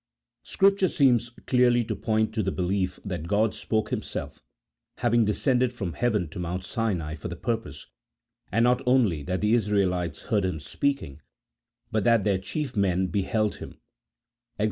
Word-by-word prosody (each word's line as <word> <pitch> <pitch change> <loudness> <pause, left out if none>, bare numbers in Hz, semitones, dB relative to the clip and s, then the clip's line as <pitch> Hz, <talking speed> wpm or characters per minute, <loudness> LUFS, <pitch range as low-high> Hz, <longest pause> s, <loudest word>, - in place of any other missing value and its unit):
Scripture 195 -1 +3
seems 125 -7 +3 0.2
clearly 125 -1 +4
to - - -3
point 110 -1 0
to 110 - 0
the 95 -1 -1
belief 90 0 -1
that 85 -5 -4
God 105 +3 +2
spoke 110 -1 -2
Himself, - - -5 0.6
having 120 -1 +3
descended 125 +3 +1
from 100 -9 -4
heaven 105 -3 0
to 80 - -8
Mount 90 +1 -3
Sinai 95 -11 -2
for 80 - -6
the 85 - -5
purpose 110 - -4 0.3
— - - -43
and 115 +4 +2
not 125 +1 +3
only 115 - +3
that 90 +6 -3
the 105 +2 +2
Israelites 95 -7 0
heard 105 -4 0
Him 90 -3 -1
speaking, 80 - -2 0.7
but 110 -2 +1
that 115 -1 +4
their 100 -3 +1
chief 135 +6 -4
men 95 -2 +1
beheld 105 +4 0
Him - - -10 0.8
(Ex. - - -39
105 Hz, 165 wpm, -26 LUFS, 90-120 Hz, 0.8 s, clearly